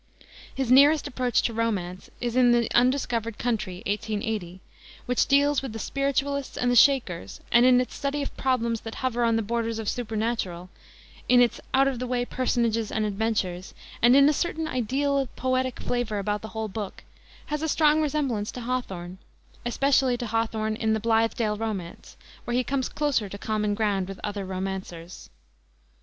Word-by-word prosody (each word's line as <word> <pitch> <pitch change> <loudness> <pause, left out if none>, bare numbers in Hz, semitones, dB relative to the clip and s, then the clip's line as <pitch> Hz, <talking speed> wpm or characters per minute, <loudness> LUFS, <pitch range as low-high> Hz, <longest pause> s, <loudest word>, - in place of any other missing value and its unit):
His 265 -2 -1
nearest 285 +3 +6
approach 250 -3 0
to 230 - -1
romance 195 -6 -2
is 240 -1 -2
in 245 -1 +5
the 235 -2 +2
Undiscovered 240 -3 +1
Country, 215 -7 -2
1880, 205 -3 -3 0.5
which 250 0 +1
deals 285 +1 +3
with 265 -5 -6
the - - -5
Spiritualists 275 +2 -2
and 245 0 +1
the - - +2
Shakers, 235 - +3
and 240 +2 +6
in 250 -1 +6
its 250 - -2
study 280 0 -2
of - - -6
problems 235 -4 0
that 225 - -7
hover 245 -2 -1
on 230 -1 +3
the 225 - 0
borders 230 +1 -2
of 225 - -4
the - - +1
supernatural, 220 -6 -3 0.6
in 245 - +6
its 245 -1 +2
out 270 +1 +4
of 265 -3 -2
the 250 - -3
way 245 0 0
personages 235 -3 0
and 215 -1 0
adventures, 200 -4 -2 0.3
and 240 +2 +6
in 280 0 +7
a 300 - +4
certain 320 0 -2
ideal 275 +2 0
poetic 255 0 -1
flavor 245 -4 -2
about 205 +1 -2
the 220 - -7
whole 220 0 -1
book, 205 -1 -6 0.5
has 300 - -1
a 320 - -1
strong 305 0 +4
resemblance 275 -9 -1
to 250 - -6
Hawthorne, 190 -8 -4 0.5
especially 265 0 +2
to 240 - -4
Hawthorne 220 -1 -1
in 220 -1 +1
the 220 - 0
Blithedale 225 -1 +1
Romance, 200 -7 -5 0.3
where 240 - -2
he 255 - +2
comes 265 0 -1
closer 275 -9 0
to 200 - -7
common 210 0 -1
ground 205 -4 0
with 195 -1 -8
other 205 -2 -3
romancers. 185 -2 -6
235 Hz, 175 wpm, -26 LUFS, 210-255 Hz, 0.6 s, in